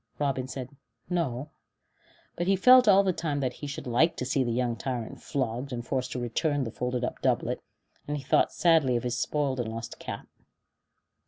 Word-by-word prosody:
Robin 135 -3 -1
said 130 +1 -7 0.4
"No," 150 -4 -1 0.8
but 175 - -2
he 195 - +4
felt 250 +5 +7
all 200 -1 +7
the 190 -2 +1
time 150 -4 -2
that 130 -3 -1
he 145 - -4
should 140 0 -6
like 130 +7 +3
to 125 - -2
see 130 +1 +1
the 120 - -1
young 120 0 0
tyrant 125 -3 -4
flogged 130 0 -2
and 120 -1 -4
forced 130 -1 -2
to 125 - -3
return 140 +4 0
the 115 - -4
folded 125 +1 -2
up - - -3
doublet; - - 0 0.5
and 150 0 -1
he 140 - -7
thought 130 - +3
sadly 160 -7 +3
of 120 - 0
his 120 -1 -1
spoiled 140 -3 0
and 115 -2 -2
lost 115 0 -7
cap. - - -6
130 Hz, 195 wpm, -28 LUFS, 125-150 Hz, 0.8 s, felt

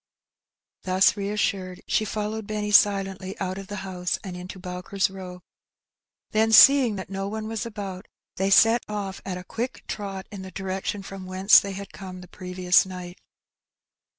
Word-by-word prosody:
Thus 185 +1 +3
reassured, 200 -2 -2
she 215 - +1
followed 215 0 -3
Benny 210 -1 -2
silently 195 -1 +3
out 185 0 -3
of 195 - -9
the 205 - -6
house 180 -2 -2
and 185 -3 -6
into 180 +1 -8
Bowker's 185 +1 -2
Row; 180 -2 -9 0.9
then 220 +1 +2
seeing 255 -1 +8
that 190 0 -7
no 195 0 -3
one 215 +1 -4
was 225 +1 -3
about, 200 -4 -7 0.3
they 190 +1 +1
set 225 +4 +6
off 200 -2 -4
at 185 -2 -3
a 180 - -8
quick 235 +7 -5
trot 195 -2 -5
in 200 -2 -7
the 190 - -8
direction 190 +1 -4
from 195 -1 -8
whence 190 +2 +6
they 200 -1 -5
had 200 +1 -8
come 185 -2 -9
the 180 - -12
previous 180 0 +2
night. 180 -1 -9
195 Hz, 165 wpm, -25 LUFS, 185-210 Hz, 0.9 s, seeing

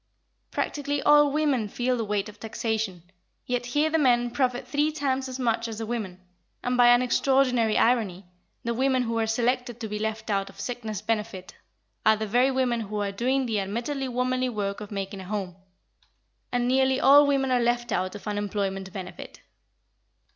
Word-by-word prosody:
Practically 290 0 -2
all 295 0 +6
women 285 -7 +1
feel 250 +4 0
the 230 - -2
weight 205 -1 -1
of 210 0 -12
taxation, 220 -5 -3 0.4
yet 245 -1 -2
here 295 +5 +2
the 320 - +2
men 240 -3 +3
profit 250 0 -1
three 295 +1 +1
times 270 -3 -1
as 255 - -5
much 230 -2 0
as 225 -2 -6
the 225 - -4
women, 215 -6 -4 0.4
and 250 0 0
by 245 -1 +6
an 245 +1 +6
extraordinary 250 -3 +2
irony, 210 -6 +1 0.4
the 235 - -1
women 260 +1 +2
who 230 -1 -1
are 225 - +1
selected 240 +1 0
to 225 - -4
be 210 0 -4
left 220 0 -3
out 195 -1 0
of - - -15
sickness 225 -5 -5
benefit 210 -4 -3 0.5
are 220 0 +5
the 220 0 -3
very 245 +5 +3
women 255 -3 +1
who 210 -1 -4
are 200 -1 -1
doing 255 +6 0
the 220 -3 0
admittedly 235 +8 -3
womanly 255 +1 0
work 205 -3 -3
of 210 - -7
making 195 -1 -5
a - - -9
home, 190 -3 -4 1.0
and 245 0 0
nearly 265 +1 +3
all 285 +2 +7
women 270 -2 +1
are 250 -1 +3
left 240 0 0
out 185 0 -1
of 205 - -9
unemployment 200 -2 -2
benefit. 190 -3 -8
235 Hz, 185 wpm, -26 LUFS, 210-255 Hz, 1.0 s, all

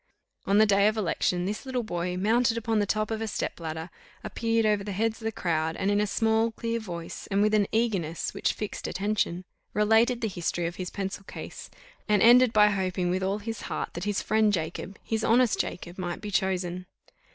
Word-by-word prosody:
On 200 - +4
the 215 - +7
day 200 0 +4
of 215 +1 +1
election, 180 -2 0
this 205 +2 -3
little 260 -2 -2
boy, 180 -3 -3
mounted 230 +4 +2
upon 225 -1 0
the 205 - +1
top 215 +2 0
of 220 0 -2
a 225 - -2
step 205 - -3
ladder, 160 +1 -5 0.3
appeared 230 -1 0
over 210 -2 +2
the 200 0 -4
heads 225 +3 -1
of - - -8
the 225 - 0
crowd, 160 -5 -1
and 195 +1 0
in 205 0 +2
a 210 - +1
small 225 +2 +2
clear 230 +1 -3
voice, 175 -6 -7
and 200 -1 +1
with 215 0 +2
an 205 -2 +3
eagerness 195 -8 -1
which - - 0
fixed 210 - -5
attention, 195 -2 -1 0.3
related 225 +3 +3
the 225 - 0
history 175 -3 -2
of 170 +1 -4
his 180 -1 -4
pencil 195 0 -4
case, - - -8 0.4
and 210 -1 +4
ended 245 +1 +7
by 210 -1 +6
hoping 185 -2 -1
with 185 +1 0
all 195 +2 0
his 225 +1 -5
heart - - -3
that 170 +3 -5
his 205 -1 -1
friend 215 -1 +3
Jacob, 175 +3 -3
his 220 -1 -2
honest 240 0 +3
Jacob, 175 +1 -4
might 175 -1 -3
be 210 -1 -6
chosen. 185 -1 -1
205 Hz, 210 wpm, -27 LUFS, 180-220 Hz, 0.4 s, the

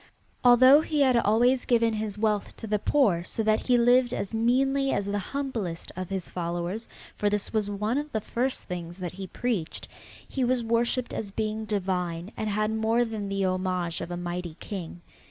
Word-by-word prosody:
Although 255 +4 +8
he 305 -2 0
had 260 -3 +4
always 240 +3 +3
given 230 -2 +3
his 215 -1 -3
wealth 210 -1 -1
to - - -7
the 210 -1 0
poor 200 -11 +2
so 225 - -3
that 215 0 +3
he 250 -1 +5
lived 245 +1 +4
as 200 - -4
meanly 270 +4 +2
as 200 - 0
the 205 +1 -1
humblest 225 -8 -4
of 185 -1 -5
his 190 -2 -3
followers 175 +5 -3 0.3
for 205 - +1
this 210 +1 -2
was 215 -2 0
one 210 +6 -1
of 295 0 -6
the 220 - 0
first 250 +5 -2
things 175 -1 -6
that 180 -3 -4
he 190 +1 -7
preached, 210 -4 -3 0.4
he 265 - -2
was 250 -1 +1
worshipped 235 +2 0
as 210 - -3
being 215 +2 -3
divine 180 -3 -2
and 215 - -2
had 215 +1 0
more 220 +2 +2
than 215 -3 -4
the 195 -1 0
homage 185 -2 -1
of 170 - -5
a 175 - -4
mighty 175 -1 -4
king. 175 -4 -7
215 Hz, 190 wpm, -27 LUFS, 185-240 Hz, 0.4 s, Although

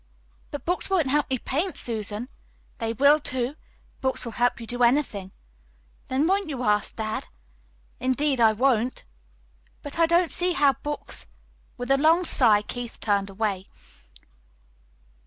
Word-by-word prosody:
"But 290 - -7
books 355 +3 0
won't 370 -5 +2
help 295 0 +2
me 260 - 0
paint, 315 - -2
Susan." 220 0 -2 0.5
"They 225 -2 -1
will, 280 +6 +5
too. 260 -1 -2 0.5
Books 260 -1 +1
will 235 - -5
help 245 +2 0
you 230 - -7
do 245 +2 -5
anything." 235 -7 +1 0.8
"Then 260 +1 0 0.3
you 285 -4 -4
won't 215 -4 +3
ask - - -7
dad?" 220 -1 -4 0.7
"Indeed, 260 +1 +1
I 225 -1 +6
won't." 245 +1 +1 0.8
"But 290 +3 -7
I 330 - +5
don't 340 0 +3
see 360 0 +1
how 290 -5 +4
books 295 +4 -5 0.2
" - - -35
With 245 +1 -3
a 275 - +5
long 325 +5 +4
sigh 215 -9 +4
Keith 245 +1 -7
turned 200 -2 0
away. 195 -1 -3
255 Hz, 150 wpm, -25 LUFS, 225-295 Hz, 0.8 s, I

